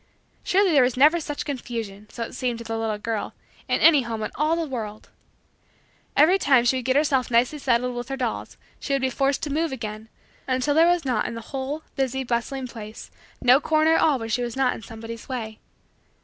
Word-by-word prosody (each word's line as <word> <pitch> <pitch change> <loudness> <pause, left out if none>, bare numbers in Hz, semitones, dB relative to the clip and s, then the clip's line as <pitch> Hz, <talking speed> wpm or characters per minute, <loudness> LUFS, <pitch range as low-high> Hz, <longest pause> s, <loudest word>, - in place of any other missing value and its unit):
Surely 390 -1 +3
there 285 -4 +5
was 250 0 +1
never 305 +6 +6
such 295 -2 -5
confusion, 230 -7 -5
so 235 - -5
it - - -7
seemed 250 -2 -2
to 235 - -8
the 225 0 -4
little 225 -1 -2
girl, 220 0 -4 0.3
in - - 0
any 305 -4 +7
home 225 -3 -4
in 215 - -4
all 305 +3 +1
the 335 -1 -1
world. 220 -6 -6 1.1
Every 345 +7 +6
time 265 -8 +4
that 240 - +3
she 260 - +2
would 255 - -5
get 260 0 +2
herself 280 -3 +2
nicely 245 +5 +2
settled 250 -2 +1
with 240 +2 -5
her 270 - -3
dolls 245 -4 -4 0.2
she 280 - -3
would 275 - +1
be 260 - +1
forced 275 +4 0
to 290 -3 -2
move 320 0 0
again; 220 -3 -6 0.4
until 260 +2 +1
there 325 +3 +5
was 350 -3 +2
in 235 -2 -1
the 230 - -6
whole, 280 +3 -4
busy, 265 -1 -1
bustling 250 +2 -2
place 220 -3 -9 0.3
no 250 +3 +6
corner 315 0 +3
at - - +3
all 300 -4 +4
where 225 -2 -5
she 225 +2 0
was 240 0 -4
not 265 -2 +2
in - - -9
somebody's 225 +3 -9
way. 220 -4 -5
255 Hz, 220 wpm, -24 LUFS, 230-285 Hz, 1.1 s, any